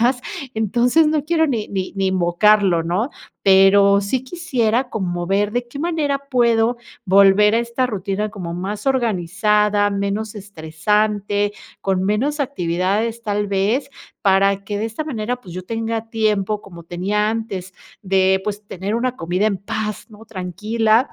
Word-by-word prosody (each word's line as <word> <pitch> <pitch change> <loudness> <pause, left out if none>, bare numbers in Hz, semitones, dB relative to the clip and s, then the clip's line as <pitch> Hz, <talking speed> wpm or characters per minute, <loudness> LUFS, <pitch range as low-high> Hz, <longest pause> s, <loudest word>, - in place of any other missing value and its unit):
más, 245 +2 +2 0.3
entonces 240 +8 +3
no 305 -1 +1
quiero 320 0 +2
ni 230 -7 -2
ni 190 -2 -3
ni 195 -1 0
invocarlo, 185 0 +3
¿no? 180 - -1 0.3
Pero 200 +1 +6
sí 245 +6 -2
quisiera 255 -6 0
como 175 -6 -3
ver 205 +3 +1
de 240 0 -2
qué 280 +4 -9
manera 310 -4 0
puedo 235 -1 +2 0.3
volver 200 +2 +5
a - - +3
esta 235 +2 -1
rutina 205 -1 -3
como 180 -5 -6
más 195 +7 -5
organizada, 210 -3 +2
menos 200 +2 -2
estresante, 205 +3 -1 0.3
con 190 -1 0
menos 260 +10 0
actividades 205 -1 -1
tal 205 -1 -1
vez, 205 +8 0 0.3
para 195 0 +3
que 205 +1 -3
de 215 - -2
esta 225 +8 -5
manera, 245 -4 -3
pues, 180 - -11
yo 185 - -5
tenga 225 +2 -3
tiempo 215 -2 0
como 170 -3 -12
tenía 200 +5 -1
antes 195 -4 -4 0.3
de, 190 -1 +2
pues, 210 0 -4
tener 195 +2 -4
una 250 +2 -1
comida 180 +5 0
en 200 -3 0
paz, 215 +2 -4
¿no? 215 +1 -14
tranquila. 215 - 0
210 Hz, 150 wpm, -20 LUFS, 195-230 Hz, 0.3 s, Pero